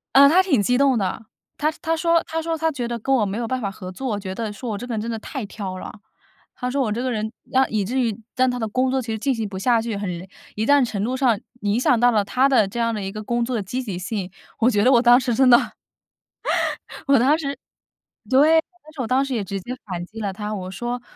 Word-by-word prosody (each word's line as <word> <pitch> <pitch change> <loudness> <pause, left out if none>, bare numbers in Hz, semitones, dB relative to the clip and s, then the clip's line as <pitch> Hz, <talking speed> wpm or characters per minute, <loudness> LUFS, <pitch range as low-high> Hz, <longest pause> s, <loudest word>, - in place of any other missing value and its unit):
呃， 280 +1 +9
她 340 +6 +6
挺 295 - +2
激 245 +5 +2
动 270 -2 +4
的， 200 +2 -2 0.3
她 305 +1 +1
她 325 0 0
说 335 0 +3
她 325 0 -3
说 325 0 -2
她 320 +1 +1
觉 250 -5 -3
得 235 0 -3
跟 270 +4 -1
我 240 -6 +3
没 200 +1 -3
有 235 -1 -2
办 255 +2 -1
法 200 - -1
合 185 -1 -8
作， 220 +1 -3
觉 190 -2 -5
得 220 +1 -4
说 210 +4 -6
我 205 - -3
这 245 - -7
个 245 - -4
人 215 - -1
真 230 - -4
的 225 - -3
太 255 +1 -5
挑 195 -2 -6
了。 - - -7 0.6
她 250 - -3
说 275 +2 0
我 230 -5 0
这 230 +3 -2
个 255 0 -1
人， 220 -1 -2 0.2
让 265 0 +3
以 210 -3 0
至 250 +6 -1
于 225 -4 -1 0.2
让 255 0 +3
她 250 - -2
的 225 -2 -2
工 255 +5 +1
作 265 0 0
其 240 - -10
实 220 - -2
进 270 +5 +1
行 225 -3 -3
不 195 -1 -7
下 235 +2 +3
去， 225 -1 -3
很 200 -1 -3 0.5
一定 270 +6 +4
程 205 -4 -3
度 250 +4 -1
上 250 -6 +2 0.2
影 205 +2 +1
响 250 -1 +3
到 245 +1 +5
了 215 -3 +2
她 260 +6 +2
的 245 -7 +4
这 215 +5 -5
样 230 0 +1
的 210 - -3
一 195 - -4
个 215 +1 -6
工 235 +2 0
作 250 +1 -2
的 220 - 0
积 250 +7 -4
极 200 -7 -4
性。 190 -1 -4 0.3
我 235 - +4
觉 205 -4 +2
得 255 - +5
我 240 -3 +6
当 245 0 +7
时 255 -2 -1
真 265 +2 +4
的， 240 - +9 1.5
我 275 0 +6
当 275 +6 +4
时 280 -3 -4 0.7
对， 305 +5 +6 0.2
但 310 +1 -16
是 295 - -5
我 240 - -2
当 260 +3 +2
时 275 -1 -3
也 220 - -1
直 195 0 -4
接 245 - -6
反 180 -4 -4
击 220 +4 -11
了 200 -3 -2
她， 210 +2 -4
我 185 -2 -5
说 240 +6 -4
235 Hz, 300 characters per minute, -22 LUFS, 210-265 Hz, 1.5 s, 呃